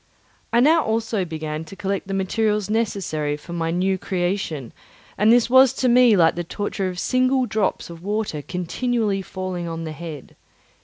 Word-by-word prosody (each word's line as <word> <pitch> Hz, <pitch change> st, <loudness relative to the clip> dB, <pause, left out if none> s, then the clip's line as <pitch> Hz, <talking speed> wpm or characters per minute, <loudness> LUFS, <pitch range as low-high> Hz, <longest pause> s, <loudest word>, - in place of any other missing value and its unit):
I 235 Hz, -, +4 dB
now 315 Hz, +4 st, +5 dB
also 220 Hz, -3 st, -1 dB
began 155 Hz, -1 st, -5 dB
to 195 Hz, -, -11 dB
collect 195 Hz, 0 st, -3 dB
the 195 Hz, -, -2 dB
materials 210 Hz, +1 st, 0 dB
necessary 180 Hz, -10 st, -1 dB
for 170 Hz, +3 st, -10 dB
my 165 Hz, -1 st, -1 dB
new 185 Hz, +3 st, 0 dB
creation, 175 Hz, -, -2 dB, 0.4 s
and 215 Hz, +2 st, +4 dB
this 240 Hz, -1 st, +5 dB
was 260 Hz, +1 st, +6 dB
to 255 Hz, -, 0 dB
me 245 Hz, -3 st, +6 dB
like 165 Hz, -2 st, +5 dB
the 175 Hz, -, -3 dB
torture 195 Hz, +2 st, -3 dB
of 180 Hz, -, -7 dB
single 255 Hz, +4 st, +2 dB
drops 215 Hz, -4 st, -1 dB
of 165 Hz, -1 st, -11 dB
water 205 Hz, -5 st, -2 dB
continually 200 Hz, -, -1 dB
falling 185 Hz, -2 st, -5 dB
on 165 Hz, 0 st, -5 dB
the 160 Hz, -, -5 dB
head. 155 Hz, -3 st, -9 dB
195 Hz, 170 wpm, -22 LUFS, 170-225 Hz, 0.4 s, was